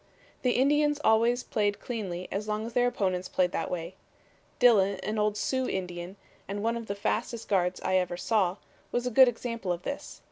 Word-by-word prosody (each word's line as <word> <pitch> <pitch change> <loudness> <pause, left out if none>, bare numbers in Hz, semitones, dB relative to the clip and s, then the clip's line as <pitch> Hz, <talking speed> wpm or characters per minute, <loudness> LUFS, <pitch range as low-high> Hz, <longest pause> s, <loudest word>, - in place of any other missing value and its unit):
The 250 -1 +2
Indians 295 +3 +3
always 230 +3 +3
played 205 -1 0
cleanly 190 -7 -4
as 210 +2 -3
long 215 +1 -2
as 230 - -7
their 245 +1 +3
opponents 185 -6 -1
played 180 -1 +1
that - - -2
way. 170 0 -4 0.6
Dillon, 200 -6 +4
an 215 +1 -2
old 210 0 +1
Sioux 260 +2 0
Indian, 180 0 -4 0.3
and 205 +1 -4
one 230 +1 +1
of 230 -1 -6
the 200 - -3
fastest 225 +3 -2
guards 180 -2 +1
I 185 - +2
ever 180 -1 -1
saw, 190 -2 +1 0.3
was 245 0 -1
a 250 - -1
good 260 +2 +8
example 230 -5 -2
of 175 0 -3
this. 280 - -6
210 Hz, 190 wpm, -28 LUFS, 185-240 Hz, 0.6 s, good